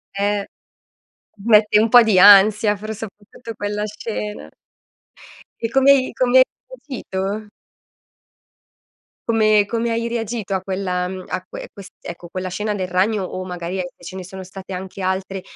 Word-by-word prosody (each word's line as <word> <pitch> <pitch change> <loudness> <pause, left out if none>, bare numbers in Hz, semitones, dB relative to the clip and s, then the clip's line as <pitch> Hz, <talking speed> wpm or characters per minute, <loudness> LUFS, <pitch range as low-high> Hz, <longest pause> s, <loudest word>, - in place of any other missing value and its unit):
Eh 205 0 0 1.0
mette 210 -2 +5
un 220 +1 +2
po' 245 -1 +9
di 215 -4 +3
ansia 205 +2 +7
pro 215 +2 -6
soprattutto, 220 +2 -10
quella 205 0 -3
scena. 210 0 -6 1.1
E 230 - 0
come 270 +3 +5
hai 265 -2 +4
e - - -11
come 255 0 +3
hai 260 - +9 0.4
reagito? 205 -4 -4 1.8
Come 215 -2 +4
come 230 +1 -1
hai 230 +1 -1
reagito 225 -3 -3
a 185 - -1
quella, 185 -2 -2
mhmm 185 0 -7
a 185 - -4
quel - - -8
quest 200 -1 -13
ecco, 170 0 -9
quella 185 0 -4
scena 210 +3 -2
del 185 -2 -3
ragno, 190 +3 +1
o 185 0 -5
magari 180 0 -5
e 180 - -3
ce 175 +2 -10
ne 185 - -6
sono 190 +1 -9
state 190 +1 -10
anche 190 +1 -7
altre 190 0 -2
205 Hz, 160 wpm, -20 LUFS, 185-220 Hz, 1.8 s, po